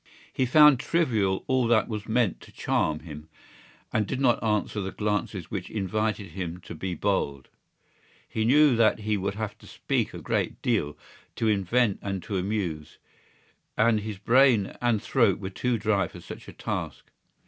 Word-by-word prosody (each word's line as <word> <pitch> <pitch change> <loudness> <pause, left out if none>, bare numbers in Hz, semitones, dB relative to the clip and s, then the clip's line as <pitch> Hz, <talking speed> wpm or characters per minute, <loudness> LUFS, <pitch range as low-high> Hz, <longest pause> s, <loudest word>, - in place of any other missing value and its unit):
He 130 - 0
found 150 0 +7
trivial 110 - +1
all 130 -2 +1
that 115 -2 +3
was 105 -2 -5
meant 115 -4 +1
to - - -14
charm 75 0 -1
him 75 -1 -10 0.6
and 105 -2 +1
did 130 - -3
not 125 -4 +2
answer 105 -1 0
the 95 0 -4
glances 105 -4 -3
which 95 -4 -4
invited 105 -1 -2
him 90 -1 -5
to - - -9
be 90 +2 -4
bold. 70 -4 -1 0.8
He 110 - -2
knew 140 +3 +5
that 110 -1 +3
he 105 0 0
would 100 0 -2
have 105 -1 -4
to - - -15
speak - - -2
a - - -6
great - - -2
deal, 75 +1 0 0.4
to 115 - 0
invent 105 +2 +1
and 95 -3 -4
to 100 - -3
amuse, 90 -6 -3 0.8
and 110 0 +3
his 105 -1 -6
brain 115 -1 +3
and 120 -4 +1
throat - - +3
were 95 - -6
too 125 +4 -1
dry 105 -2 +1
for - - -12
such - - -10
a - - -10
task. - - -5
105 Hz, 170 wpm, -26 LUFS, 95-115 Hz, 0.8 s, found